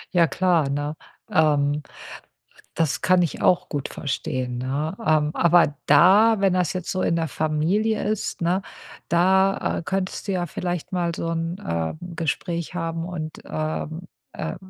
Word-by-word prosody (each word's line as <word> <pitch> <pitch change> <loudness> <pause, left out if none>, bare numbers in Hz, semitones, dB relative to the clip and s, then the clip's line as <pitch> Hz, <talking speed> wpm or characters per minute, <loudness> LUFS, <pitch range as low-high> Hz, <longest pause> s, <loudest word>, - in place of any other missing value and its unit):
Ja, 170 -2 +5
klar, 170 -3 +2
ne? 145 +2 -2 0.4
Ähm, 150 -1 +2 0.9
das 160 -4 0
kann 185 -1 +4
ich 165 - -3
auch 180 - +3
gut 145 -3 -3
verstehen, 130 -3 -3
ne? 145 +7 -2
Ähm, 155 -1 +3
aber 170 -3 +4
da, 195 +9 +6
wenn 195 -2 +3
das 180 -5 +1
jetzt 185 -2 -4
so 185 - -1
in - - +2
der 165 -1 0
Familie 165 +10 0
ist, 210 -3 -2
ne, 180 +3 +1 0.5
da, 190 +3 +3
äh, - - -7
könntest 190 +2 -3
du 195 - 0
ja 175 -1 0
vielleicht 175 +1 -4
mal 175 -2 -1
so 165 - -3
'n, 165 +2 -2
äh, 85 - -2 0.2
Gespräch 170 +2 -3
haben. 165 -1 -3
Und, 155 -3 -6
ähm, 155 +1 -3 0.3
äh - - -4
165 Hz, 155 wpm, -23 LUFS, 150-180 Hz, 0.9 s, da